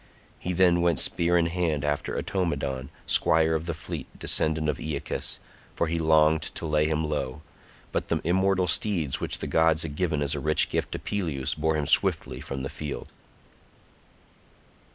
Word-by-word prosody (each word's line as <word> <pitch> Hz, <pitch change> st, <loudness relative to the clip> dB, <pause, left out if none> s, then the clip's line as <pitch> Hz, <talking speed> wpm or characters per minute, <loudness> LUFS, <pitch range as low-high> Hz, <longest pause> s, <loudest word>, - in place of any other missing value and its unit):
He 90 Hz, -, -4 dB
then 90 Hz, -1 st, +3 dB
went 85 Hz, -3 st, +2 dB
spear 85 Hz, +1 st, +2 dB
in 85 Hz, -, +2 dB
hand 85 Hz, -4 st, -1 dB
after 75 Hz, 0 st, -2 dB
Automedon, 70 Hz, -8 st, -2 dB, 0.2 s
squire 80 Hz, -1 st, +4 dB
of 80 Hz, +1 st, -2 dB
the 85 Hz, -, -2 dB
fleet 80 Hz, -3 st, -6 dB
descendant 80 Hz, 0 st, +1 dB
of 75 Hz, -, -1 dB
Aeacus, 75 Hz, -2 st, -3 dB, 0.4 s
for -, -, 0 dB
he 85 Hz, +1 st, -2 dB
longed 80 Hz, 0 st, +3 dB
to 80 Hz, +1 st, -5 dB
lay 75 Hz, -1 st, +1 dB
him 80 Hz, 0 st, -1 dB
low, 75 Hz, 0 st, -4 dB, 0.5 s
but -, -, -2 dB
the -, -, 0 dB
immortal 95 Hz, +2 st, +2 dB
steeds 85 Hz, -5 st, 0 dB
which -, -, -1 dB
the -, -, -5 dB
gods 80 Hz, 0 st, +2 dB
had 75 Hz, -3 st, -6 dB
given 80 Hz, -4 st, 0 dB
as 70 Hz, -, +1 dB
a -, -, -2 dB
rich 75 Hz, 0 st, +3 dB
gift -, -, -2 dB
to -, -, -2 dB
Peleus 80 Hz, -10 st, -2 dB
bore 80 Hz, +1 st, 0 dB
him 75 Hz, -2 st, -1 dB
swiftly -, -, +4 dB
from 65 Hz, -1 st, -6 dB
the 70 Hz, -, -4 dB
field. 75 Hz, -2 st, -7 dB
80 Hz, 175 wpm, -26 LUFS, 75-85 Hz, 0.5 s, squire